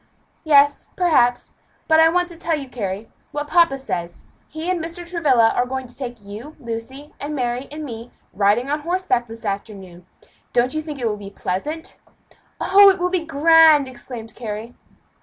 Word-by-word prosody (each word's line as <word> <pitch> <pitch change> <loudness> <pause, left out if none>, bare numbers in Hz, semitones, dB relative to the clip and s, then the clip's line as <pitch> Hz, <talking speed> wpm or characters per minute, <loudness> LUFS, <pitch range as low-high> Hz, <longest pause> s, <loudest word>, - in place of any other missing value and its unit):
"Yes, 285 -2 +4
perhaps 255 -9 +2 0.3
but 315 0 +5
I 320 0 +7
want 355 +1 +1
to 345 - -10
tell 330 -1 -1
you, 275 -2 -7
Carry, 210 -3 -5 0.2
what 295 0 -4
papa 335 -4 +4
says. 175 -10 -5 0.2
He 315 +2 -7
and 360 -3 -1
Mr. 340 +1 -6
Travilla 280 -10 +3
are 245 - 0
going 260 0 -4
to 245 - -10
take 245 -5 -7
you, 225 +10 -9
and 280 - -19
Lucy, 245 +6 -7
and 300 +1 -4
Mary, 245 0 -2
and 305 +1 -6
me, 230 -2 -8 0.2
riding 210 +5 +2
on 300 - 0
horseback 330 -7 -1
this 225 0 -10
afternoon. 195 -3 -6 0.5
Don't 245 +1 +2
you 310 - -1
think 305 -2 -7
it 245 -3 -1
will 210 -1 -2
be 200 -1 -9
pleasant?" 300 - -4 0.6
"Oh, 400 +1 +7
it 380 - +2
will 360 0 0
be 365 -3 0
grand!" 320 -1 +5
exclaimed 240 -3 -9
Carry. 225 0 -6
270 Hz, 180 wpm, -21 LUFS, 230-320 Hz, 0.6 s, I